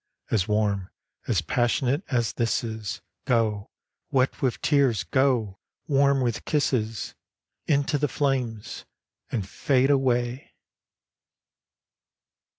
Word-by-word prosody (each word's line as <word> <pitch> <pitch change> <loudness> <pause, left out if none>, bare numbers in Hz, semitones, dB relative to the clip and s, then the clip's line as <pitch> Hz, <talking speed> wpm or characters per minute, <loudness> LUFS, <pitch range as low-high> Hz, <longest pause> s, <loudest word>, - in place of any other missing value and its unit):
As 100 -3 +2
warm, 105 -3 0 0.4
as 95 -7 +1
passionate, 125 - +1
as 120 -5 0
this 115 0 0
is, 110 -4 -5 0.2
Go! 110 -4 +1 0.4
wet 130 -1 +1
with 130 -4 0
tears, 140 -7 +3
go! 125 -8 +1 0.3
warm 140 -1 +3
with 120 -3 -1
kisses. 115 -7 -1 0.5
Into 145 0 +2
the 150 - +2
flames, 130 -7 -2 0.5
and 105 -6 -2
fade 135 +5 +2
away 125 -2 0
120 Hz, 100 wpm, -26 LUFS, 110-135 Hz, 0.5 s, tears